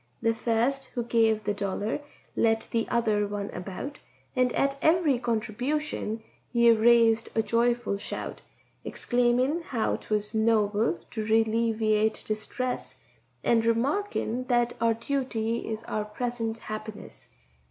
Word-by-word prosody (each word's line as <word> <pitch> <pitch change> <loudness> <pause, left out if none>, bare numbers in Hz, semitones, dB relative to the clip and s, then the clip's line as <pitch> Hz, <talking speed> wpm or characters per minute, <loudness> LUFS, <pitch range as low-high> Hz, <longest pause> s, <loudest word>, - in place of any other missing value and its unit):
The 230 - +2
first 240 +4 0
who 240 - 0
gave 225 -2 +2
the 205 +1 0
dollar 200 +5 -2 0.3
led 225 -1 +3
the 230 -1 0
other 215 -3 +1
one 205 0 -4
about, 195 +11 -6 0.4
And 255 -1 +3
at 275 0 +1
every 315 -5 +3
contribution 235 0 -2 0.3
he 235 -1 +5
a - - +8
raised 230 0 +4
a 225 - +3
joyful 235 -2 +1
shout, - - -5 0.4
Exclaimin' 245 +6 +1
how 240 -9 -1
'twas 210 0 -2
noble 220 +3 +2
to 220 - -3
relieviate 220 -1 +2
distress, 245 +4 -4 0.4
And 230 -1 +3
remarkin' 255 - 0
that 240 -1 +2
our 230 -1 +3
duty 230 -2 -2
is 220 0 -4
our 210 -1 -2
present 230 +1 -3
happiness. 215 -1 -8
230 Hz, 125 wpm, -27 LUFS, 220-245 Hz, 0.4 s, a